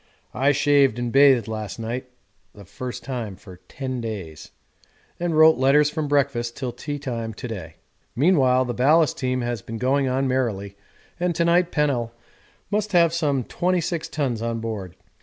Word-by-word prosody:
I 135 +2 +2
shaved 140 -4 +3
and 120 -1 -2
bathed 135 -3 +5
last 110 -2 -5
night 120 +3 -5 0.5
(the 100 -1 -13
first 125 +7 -7
time 120 -7 -5
for 90 0 -13
10 130 -2 -5
days) 95 -9 -7 0.7
and 170 -2 -1
wrote 160 -2 +6
letters 145 +3 +4
from 155 -1 -2
breakfast 135 -5 0
till 130 -3 -3
tea 145 +5 -5
time 115 -6 -5
to 125 - -6
day. 90 -8 -7 0.4
Meanwhile 130 -4 +3
the 120 - -3
ballast 150 +4 +3
team 130 0 -1
has 120 -3 -3
been 115 +3 -7
going 135 +3 +1
on 130 +1 0
merrily, 110 -7 -2 0.4
and 175 -1 0
to 170 - +1
night 175 +1 +3
Pennell 125 -6 0 0.6
must 210 0 -1
have 170 -2 +4
some 145 -6 0
26 170 +1 -1
tons 130 -8 -2
on 115 0 -2
board. 105 -6 -5
130 Hz, 165 wpm, -23 LUFS, 115-150 Hz, 0.7 s, wrote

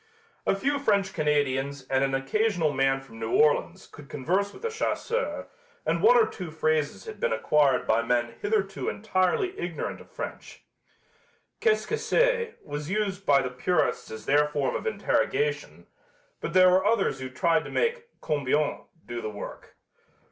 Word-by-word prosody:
A - - +3
few 280 +8 0
French 200 -7 +1
Canadians 140 -3 0
and 135 0 +2
an 135 0 +1
occasional 165 +3 +1
man 135 0 +2
from 115 -4 -14
New 115 0 -3
Orleans 150 -1 +2
could 145 -1 -14
converse 185 +9 0
with - - -14
the 465 - -1
chasseurs 470 +2 -2 0.4
and - - 0
one 485 +3 +7
or 450 - +6
two 180 - -7
phrases 155 -1 -1
had 440 -2 -8
been 485 0 0
acquired 145 -4 +2
by 110 +1 +3
men 120 0 0
hitherto 205 -2 -1
entirely 205 - 0
ignorant 175 -2 -4
of - - -16
French. - - -8 1.0
"Qu'est 440 -2 +3
ce - - -9
que 450 - -1
c'est?" 485 -2 +1
was 145 +1 -5
used 200 -1 -2
by 140 -2 +5
the 130 - -3
purists 155 +7 0
as 110 0 -8
their 145 +1 +4
form 145 -3 -1
of - - -3
interrogation, 445 0 -1 0.5
but 170 - -5
there 185 0 +7
were 185 +1 +4
others 210 -10 +1
who 130 0 -5
tried 165 +5 +1
to - - -7
make 470 0 -1
"combien" 145 0 0 0.2
do 120 0 -5
the 110 - -4
work. 105 -1 -9
160 Hz, 170 wpm, -27 LUFS, 135-215 Hz, 1.0 s, one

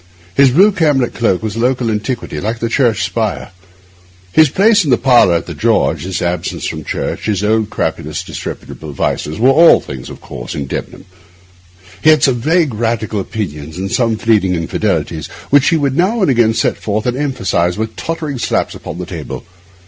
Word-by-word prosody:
His 135 +6 +5
blue 190 +11 +5
camlet 150 - +1
cloak 110 -4 0
was 110 -1 -3
a - - -4
local 125 -1 +1
antiquity, 110 - -3
like 110 +3 -2
the 115 0 -2
church 120 -4 +1
spire. - - -2 0.8
His 155 +9 +5
place 205 +5 +4
in 150 - -2
the 125 - +4
parlour 120 -9 +4
at 85 - -1
the - - -6
George, - - +1
his 95 -1 -3
absence 85 -1 -2
from - - -4
church, - - -4
his 105 -2 0
old, 110 0 +1
crapulous, - - -3
disreputable 75 -2 -7
vices, 75 +2 -2
were 125 +5 +4
all 165 +5 +7
things 65 -2 -8
of - - -10
course - - -8
in 70 - -3
Debenham. 70 - -6 1.0
He - - +5
had 155 -1 +5
some 125 -3 +2
vague 160 -1 +2
Radical 110 -1 -1
opinions 80 -7 -5
and 95 +1 -4
some 115 -3 +1
fleeting 105 -5 +2
infidelities, 80 -2 -2 0.2
which 145 -1 +5
he 165 - +2
would 140 -3 0
now 195 +6 +1
and 145 - +3
again 115 -3 +3
set - - 0
forth 105 +1 -2
and 125 -1 0
emphasise 95 -11 -1
with 110 0 -3
tottering 155 -3 -4
slaps - - -1
upon - - -8
the 90 - -5
table. 85 -4 -7
115 Hz, 185 wpm, -15 LUFS, 95-135 Hz, 1.0 s, all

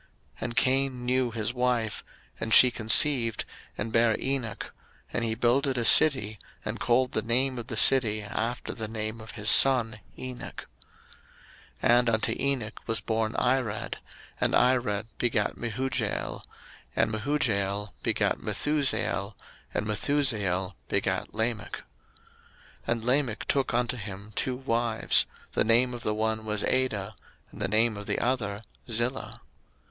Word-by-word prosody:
01:004:017 - - -32 0.3
And 120 +1 -4
Cain 130 -1 +1
knew 125 0 +1
his 115 0 -3
wife; 125 -3 -1 0.4
and 115 - -4
she 125 - +9
conceived, 115 0 +4 0.3
and 110 +2 -4
bare 115 -1 +2
Enoch: 130 -6 -3 0.4
and 120 - -1
he 110 -1 -1
builded 130 +3 +1
a 120 - 0
city, 110 -7 +5 0.3
and - - -4
called 125 +1 +1
the 110 - -1
name 125 +3 0
of 115 - -7
the 115 -4 -5
city, 110 -4 +4
after 115 +4 -4
the 110 -2 -5
name 110 0 -5
of 110 0 -11
his 105 -1 -5
son, 115 -5 +6 0.2
Enoch. 130 -1 -8 1.2
01:004:018 - - +4
And 120 -1 +1
unto 110 -1 0
Enoch 135 -6 -2
was 115 -1 -1
born 110 +1 -2
Irad: 125 -4 -1 0.4
and - - 0
Irad 120 -5 +2
begat 115 -4 0
Mehujael: 120 +3 -3 0.5
and - - +1
Mehujael 110 -5 -1
begat - - 0
Methusael: 120 -8 -1 0.4
and - - -2
Methusael 105 -6 -1 0.2
begat - - -2
Lamech. 110 -2 -2
01:004:019 - - -12 1.1
And 115 -1 -1
Lamech 125 -2 0
took 135 -4 0
unto 125 +1 0
him 100 -1 -8
two 130 +4 -2
wives: 115 -3 +2 0.2
the - - +1
name 120 +3 +3
of 120 - -7
the 105 -1 -2
one 110 0 -1
was 105 -1 -1
Adah, 110 -6 -1 0.4
and 105 - -12
the 95 - 0
name 110 +2 +2
of 100 0 -8
the - - -1
other 115 -5 -2 0.3
Zillah. 120 +3 -1
115 Hz, 145 wpm, -27 LUFS, 110-125 Hz, 1.2 s, she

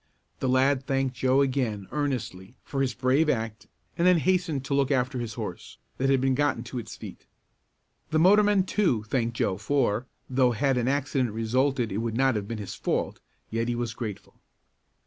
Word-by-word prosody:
The 130 - 0
lad 135 +1 +2
thanked 135 -1 0
Joe 130 +2 +3
again, 125 -7 0
earnestly, 120 -8 -3
for 135 - -3
his 130 -3 0
brave 130 +6 +2
act 110 -5 -2 0.3
and 170 - +2
then 180 -1 +6
hastened 170 -5 0
to 140 - -2
look 140 -1 +2
after 130 -1 0
his 115 -2 -5
horse, 105 -7 -7 0.2
that 135 +1 +1
had 135 -1 +4
been 135 0 +2
gotten 145 -3 0
to 125 +1 -5
its 115 0 -8
feet. 105 -5 -11 0.8
The 155 - +1
motorman, 205 +3 +5
too, 185 - +1
thanked 115 +1 -1
Joe 95 -2 0
for, 120 -1 0 0.2
though 125 -1 +2
had 135 +3 +1
an 120 - -1
accident 135 -2 0
resulted 120 +1 0
it 100 - -2
would 115 0 -2
not 135 0 +3
have 100 -1 -3
been 115 0 -4
his 105 -3 -6
fault, - - -2 0.3
yet 115 +1 -1
he 120 - 0
was 120 -2 -3
grateful. 110 -4 -7
130 Hz, 185 wpm, -27 LUFS, 115-140 Hz, 0.8 s, then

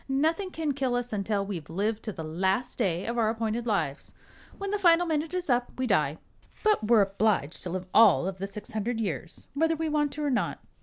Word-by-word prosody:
"Nothing 320 +8 +1
can 320 -4 -2
kill 260 -3 -1
us 245 -1 -2
until 200 0 -1
we've 175 -7 -6
lived 210 +6 -1
to 215 - -2
the 165 - -7
last 190 +11 -1
day 185 -5 0
of 235 +1 -2
our 220 -1 +3
appointed 225 +1 -2
lives. 170 -9 -2 0.4
When 395 0 -4
the 415 - 0
final 350 -2 +5
minute 320 +1 -1
is 365 -1 -1
up, 245 -2 +1
we 260 - 0
die; - - +1 0.5
but 425 - +3
we're 225 -3 +6
obliged 195 -6 0
to 180 - -4
live 185 +1 -3
all 210 -6 +6
of 190 -1 -5
the 195 - -3
six 205 +1 -8
hundred 220 +2 -2
years, 170 - -4
whether 325 +3 +2
we 320 0 -2
want 295 -1 +1
to 300 - -4
or 290 - +1
not. 250 - 0
225 Hz, 220 wpm, -28 LUFS, 195-295 Hz, 0.5 s, we're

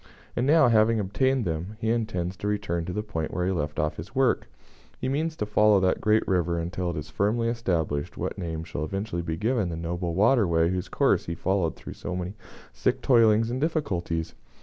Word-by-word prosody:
And 125 +2 0
now, 155 -2 +6
having 115 -1 +4
obtained 130 +5 +1
them, 85 +5 -3
he 110 - 0
intends 100 -6 -1
to 105 - -4
return 100 -5 -1
to 90 - -4
the 105 +3 -2
point 80 -7 -4
where 90 - -1
he 95 - +1
left 75 -4 -2
off 75 0 -1 0.2
work. - - +2 0.5
He - - -2
means 155 +4 -1
to 105 - -2
follow 105 -1 +4
that 95 -1 +1
great 110 +1 +2
river 85 -2 +1
until 85 +2 -2
it 85 - -4
is 75 0 -6
firmly 110 +7 +1
established 85 -11 -1
what - - -3
name 80 -4 -4
shall 80 -2 -5
eventually 95 +2 -3
be 80 -1 -3
given 110 -2 0
the 85 - -4
noble 85 +1 -3
water 110 +2 +4
way 85 0 +2
whose 90 -1 -3
course - - +2
he 85 - -2
has - - -18
followed 95 -4 +1
through - - -9
so 90 - -5
many 90 +1 -4 0.4
sick - - 0
toilings 115 -2 +4
and 130 +2 -2
difficulties. 90 - -1
95 Hz, 210 wpm, -26 LUFS, 85-110 Hz, 0.5 s, now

